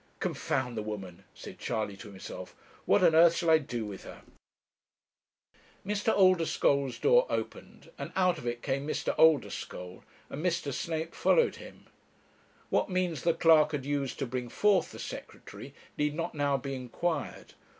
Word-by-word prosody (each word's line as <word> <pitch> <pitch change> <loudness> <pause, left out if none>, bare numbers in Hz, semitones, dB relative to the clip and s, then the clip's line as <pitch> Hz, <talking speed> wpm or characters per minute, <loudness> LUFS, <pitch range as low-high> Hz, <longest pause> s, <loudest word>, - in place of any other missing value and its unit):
'Confound 125 -2 -2
the 110 - -2
woman!' 100 -5 -7
said - - -10
Charley 105 -2 -2
to 105 - -10
himself; 95 -2 -9 0.3
'what 195 - +4
on 170 -2 +6
earth 165 +1 +6
shall 170 -2 +1
I 160 - +6
do 120 -6 -4
with 100 -2 -8
her?' - - -11 1.6
Mr. 210 +2 0
Oldeschole's 165 -8 +3
door - - +4
opened, - - -5
and - - -5
out 180 -3 +2
of 120 - -7
it 120 0 -3
came 140 +1 -2
Mr. - - -1
Oldeschole, 130 - +1 0.3
and 150 - -5
Mr. 170 -6 -1
Snape 160 +3 -3
following 475 -1 +3
him. - - -13 0.9
What - - +1
means 180 -6 -1
the 170 -1 +2
clerk 160 -2 +5
had 140 -3 -3
used 140 -2 -2
to 135 - -2
bring 125 0 -4
forth 200 - +2
the - - -10
Secretary - - -9 0.3
need 150 0 0
not 165 - -3
now 145 -2 +1
be 135 +1 -5
inquired. 135 +5 -4
150 Hz, 160 wpm, -30 LUFS, 125-170 Hz, 1.6 s, on